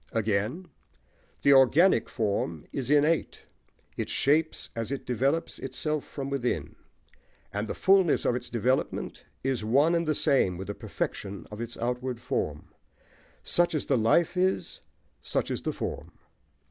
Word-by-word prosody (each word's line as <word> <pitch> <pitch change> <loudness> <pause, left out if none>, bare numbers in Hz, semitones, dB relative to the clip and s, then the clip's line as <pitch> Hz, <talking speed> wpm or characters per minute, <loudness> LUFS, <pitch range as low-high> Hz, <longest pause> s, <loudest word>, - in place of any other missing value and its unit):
Again 110 - -1 0.8
The 140 - +7
organic 140 +8 +5
form 100 - -2
is 130 -2 -4
innate: 150 +2 +2 0.5
it - - -3
shapes, 155 +3 +1
as 115 +2 -3
it 140 - -4
develops, 135 +7 0
itself 145 +3 -3
from 140 -1 -5
within, 120 - -2 0.8
and 105 +2 -2
the - - -4
fulness 190 -4 +4
of - - +3
its 125 - -5
development 125 +3 -1 0.2
is 130 -4 -1
one 140 +9 +3
and 170 -1 +1
the 155 - +2
same 135 - +3
with 95 +2 -7
the - - -2
perfection 100 -2 -5
of 105 +2 -6
its 120 0 -6
outward 125 +1 -2
form. 75 -11 -3 0.7
Such 175 -1 +1
as 150 - -1
the 140 - +2
life 120 - +3
is, 185 +1 0 0.4
such - - -1
is - - -2
the - - -2
form. - - -5
130 Hz, 145 wpm, -28 LUFS, 110-155 Hz, 0.8 s, The